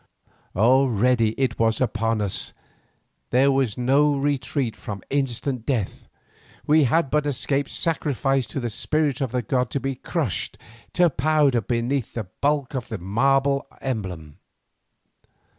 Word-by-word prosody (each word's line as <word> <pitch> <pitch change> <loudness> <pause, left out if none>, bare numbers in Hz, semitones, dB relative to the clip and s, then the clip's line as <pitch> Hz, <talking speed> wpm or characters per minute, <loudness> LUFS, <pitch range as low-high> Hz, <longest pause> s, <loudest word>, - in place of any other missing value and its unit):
Already 120 0 +3
it 130 -3 0
was 115 0 +2
upon 115 -3 0
us, 100 -2 -2 0.8
there 135 +3 +4
was 135 -6 0
no 140 +4 +3
retreat 135 -3 -1
from 100 -3 -7
instant 135 -2 -1
death, 115 -6 -3 0.6
we 150 -1 +5
had 140 +2 +1
but 150 -1 +1
escaped 140 0 -1
sacrifice 135 -5 0
to - - -4
the 120 -3 -3
spirit 150 +3 0
of 135 - 0
the 125 -1 -1
god 125 +2 0
to 140 - -2
be 135 0 -2
crushed 130 - -3 0.4
to 175 0 +5
powder 145 -4 +2
beneath 120 +4 -2
the 115 - -2
bulk 140 +9 -1
of 130 -4 -4
his 110 - -3
marble 135 +8 +1
emblem. 90 - -5
130 Hz, 135 wpm, -24 LUFS, 115-140 Hz, 0.8 s, we